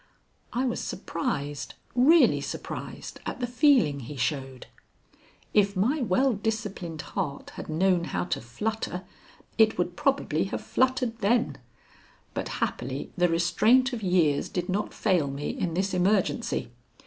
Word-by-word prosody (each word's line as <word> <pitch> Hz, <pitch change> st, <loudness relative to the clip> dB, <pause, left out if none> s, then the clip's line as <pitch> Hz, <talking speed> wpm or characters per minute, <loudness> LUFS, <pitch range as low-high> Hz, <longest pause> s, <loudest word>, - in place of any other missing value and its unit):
I 250 Hz, +2 st, 0 dB
was 245 Hz, -, -1 dB
surprised 145 Hz, -, -3 dB, 0.2 s
really 290 Hz, +8 st, +5 dB
surprised -, -, -6 dB
at -, -, -4 dB
the 250 Hz, -, 0 dB
feeling 245 Hz, -, +4 dB
he 135 Hz, +3 st, -8 dB
showed. 135 Hz, -1 st, -2 dB, 0.9 s
If 200 Hz, -1 st, +3 dB
my 250 Hz, +11 st, +1 dB
well 250 Hz, +4 st, +2 dB
disciplined 205 Hz, -7 st, -3 dB
heart 150 Hz, -8 st, -3 dB
had -, -, -8 dB
known 175 Hz, +2 st, +2 dB
how -, -, -2 dB
to 175 Hz, -, -2 dB
flutter 185 Hz, -, -3 dB, 0.6 s
it 220 Hz, 0 st, +5 dB
would 180 Hz, 0 st, -1 dB
probably 265 Hz, -, +1 dB
have 195 Hz, -, -4 dB
fluttered 255 Hz, -3 st, +1 dB
then, 230 Hz, +4 st, +1 dB, 0.7 s
but -, -, -3 dB, 0.2 s
happily -, -, -3 dB
the 180 Hz, -1 st, +3 dB
restraint 220 Hz, +10 st, +3 dB
of 235 Hz, -, -3 dB
years 175 Hz, -7 st, +2 dB
did 180 Hz, 0 st, -3 dB
not 200 Hz, +3 st, -1 dB
fail 180 Hz, -9 st, +1 dB
me 140 Hz, +1 st, -3 dB
in 170 Hz, -3 st, -2 dB
this 190 Hz, +1 st, 0 dB
emergency. 180 Hz, -, +1 dB
190 Hz, 135 wpm, -27 LUFS, 165-235 Hz, 0.9 s, really